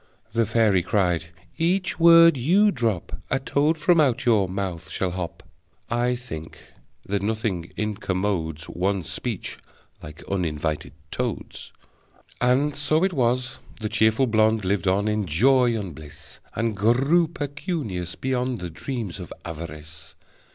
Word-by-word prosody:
The 115 -2 +2
fairy 105 -5 +3
cried: 90 -4 +1 0.3
"Each 180 +3 +1
word 165 -1 +8
you 185 - +4
drop, 115 - -2
A 135 - +2
toad 145 +4 +1
from 165 +1 +4
out 130 -3 +1
your 105 -6 +3
mouth 90 -4 -4
shall 90 +3 -2
hop!" 90 -2 -5 0.5
(I 120 +1 +1
think 80 -11 -8 0.5
that 100 0 -1
nothing 105 -5 -2
incommodes 95 -6 -2
One's 95 -1 -1
speech - - -4 0.4
like 75 0 -10
uninvited 80 -6 -2 0.2
toads!) - - -4 0.7
And 135 +4 +2
so 155 +4 +1
it 190 -1 +1
was, 125 -2 0 0.2
the 110 -2 -3
cheerful 110 +5 +3
blonde 110 -2 +2
Lived 95 -1 0
on 100 +3 +2
in 105 -2 0
joy 120 - +4
and 95 -5 -6
bliss, 75 0 -12 0.2
And 115 -1 -1
grew 135 - +3
pecunious, 145 - -4
beyond 130 -1 -1
The 90 -3 -6
dreams 110 - -5
of 90 - -8
avarice! 80 -1 -8
110 Hz, 135 wpm, -24 LUFS, 90-130 Hz, 0.7 s, word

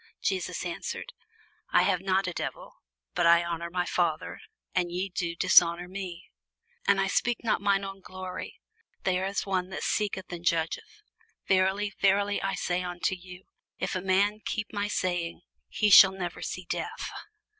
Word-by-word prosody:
Jesus 380 -1 -2
answered, - - -5 0.6
I - - +5
have 180 - +2
not 190 0 +1
a 180 - -3
devil; - - -5 0.4
but - - +3
I 170 0 +6
honour 170 0 -3
my 180 0 -1
Father, - - -1 0.3
and 175 -2 0
ye 185 +3 -2
do 170 -2 -3
dishonour 170 +1 +5
me. 185 -2 -7 0.6
And 200 -1 +4
I 195 - +3
seek 240 +4 0
not 220 -2 +1
mine 200 -1 +2
own 195 0 -6
glory: 185 0 -7 0.4
there 185 0 +1
is 200 0 -2
one 185 -2 -1
that 190 - -5
seeketh 200 -3 -1
and 170 -1 -6
judgeth. 170 - -1 0.4
Verily, 190 +2 +2
verily, 200 +1 +3
I 195 0 -1
say 180 0 -1
unto 180 0 -2
you, 180 0 -10 0.3
If - - -2
a 185 - -1
man 200 +3 +2
keep 215 0 -3
my 205 0 -1
saying, 175 -4 -2 0.3
he 210 -1 +1
shall 190 0 +10
never 180 -3 -5
see 185 - -5
death. - - -4
185 Hz, 165 wpm, -28 LUFS, 175-200 Hz, 0.6 s, shall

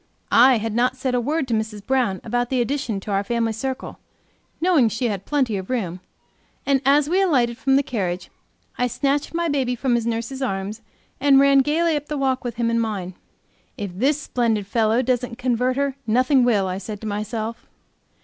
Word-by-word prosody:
I 250 +1 +6
had 225 0 -3
not 250 +3 +1
said 260 0 -2
a 245 - +1
word 290 +3 -1
to 235 - -2
Mrs. 215 -2 -3
Brown 250 -8 0
about 245 0 -1
the 260 - 0
addition 240 -4 -1
to 205 - -6
our 195 0 +1
family 230 +1 -1
circle, 260 +4 -5 0.6
knowing 320 -9 +4
she 235 +2 -1
had 200 -2 -5
plenty 260 -8 +1
of 190 -1 -7
room, 190 -9 -2 0.7
and 275 -2 +2
as 285 +1 +4
we 365 +5 +2
alighted 255 -11 +2
from 270 -1 +2
the 280 - +3
carriage, 185 -8 -3 0.5
I 250 - +2
snatched 280 +5 -1
my 340 0 0
baby 265 -5 0
from 250 +1 0
his 235 -1 0
nurse's 235 +4 -3
arms 205 -2 -3 0.4
and 275 0 +5
ran 275 0 +5
gaily 315 +4 +2
up 295 0 -4
the 300 - -3
walk 265 -1 0
with 240 -2 -4
him 230 -1 0
in 230 - +1
mine. 200 -5 -3 0.6
"If 200 -3 -4
this 275 +9 +1
splendid 230 -7 -1
fellow 225 +3 +1
doesn't 250 -1 -1
convert 250 0 0
her 280 -1 -1
nothing 255 +4 +3
will," 215 -5 +2
I 185 +1 -3
said 205 +1 -7
to 220 - -5
myself. 215 +2 -4
245 Hz, 195 wpm, -22 LUFS, 220-270 Hz, 0.7 s, I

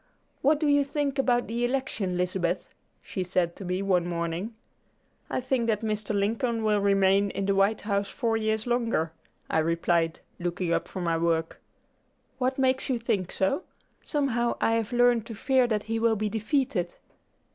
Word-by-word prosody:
"What 290 +2 +3
do 310 - 0
you 285 -1 +4
think 280 -1 -2
about 245 -2 +2
the 235 +2 -2
election, 240 -8 -1
Lizabeth?" 180 0 -1 0.3
she 185 - -3
said 180 -1 0
to - - -7
me 180 +1 -2
one 180 -3 +2
morning. 170 +5 -3 0.7
"I - - -1
think 255 -2 0
that 215 -2 +1
Mr. 215 -1 -2
Lincoln 225 +3 0
will 210 -1 +3
remain 200 0 +3
in 195 - -3
the 200 - +2
White 195 +2 +2
House 200 -1 -1
four 230 -4 -1
years 220 -1 0
longer," 230 -9 0 0.4
I - - +1
replied, 165 0 +1 0.2
looking 175 0 -1
up - - 0
from 185 - -5
my 165 -1 +1
work. 165 -1 0 0.8
"What 255 +1 0
makes 265 0 +1
you 255 - +1
think 215 -6 -1
so? 190 - 0 0.4
Somehow 245 -5 0
I - - +2
have 225 -1 0
learned 245 -2 +3
to 225 - -6
fear 255 +3 +2
that 215 -3 0
he 225 +1 -2
will 225 0 +3
be 215 0 -1
defeated." 220 - -1
215 Hz, 175 wpm, -27 LUFS, 185-240 Hz, 0.8 s, you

